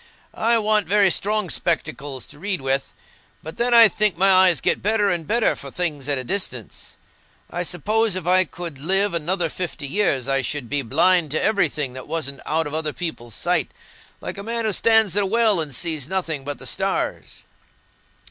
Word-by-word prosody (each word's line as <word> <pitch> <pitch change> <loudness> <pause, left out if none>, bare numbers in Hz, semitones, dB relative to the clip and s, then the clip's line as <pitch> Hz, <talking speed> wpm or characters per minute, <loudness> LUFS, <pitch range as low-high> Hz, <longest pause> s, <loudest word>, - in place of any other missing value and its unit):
I 230 +1 +1
want 215 -3 +1
very 200 0 +4
strong 210 -1 0
spectacles 145 -5 -2
to 145 - -13
read 195 0 -2
with, 135 0 -1 0.5
but 160 - -9
then 240 +1 0
I 230 -1 +10
think 210 -2 +1
my 195 +2 +4
eyes 185 -3 +5
get - - +1
better 205 -1 +1
and 170 -3 -3
better 230 +1 +2
for 140 - -9
things 150 -3 -2
at 145 - +2
a 130 - -4
distance. 125 - -5 0.5
I 175 - -3
suppose 210 +4 0
if 185 -3 -3
I 185 +1 +4
could 165 -4 -7
live 195 +6 +1
another 170 +2 0
fifty 160 -2 -5
years, 140 -5 0
I 135 0 +2
should 135 -1 -4
be 145 -1 +1
blind 165 +6 +2
to 155 - -1
everything 155 - 0
that 130 -1 -9
wasn't 140 -4 -3
out 160 +2 0
of 145 - -6
other 155 -1 -1
people's 120 - -6
sight, - - -1 0.5
like - - -6
a - - -6
man 230 +1 -3
who 215 - +1
stands 220 -3 +3
in 205 - +4
a 195 - 0
well 220 -2 +2
and 150 -2 -4
sees 155 -2 -3
nothing 165 -7 -2
but 145 +1 -5
the - - -11
stars." - - -3
175 Hz, 195 wpm, -21 LUFS, 145-205 Hz, 0.5 s, I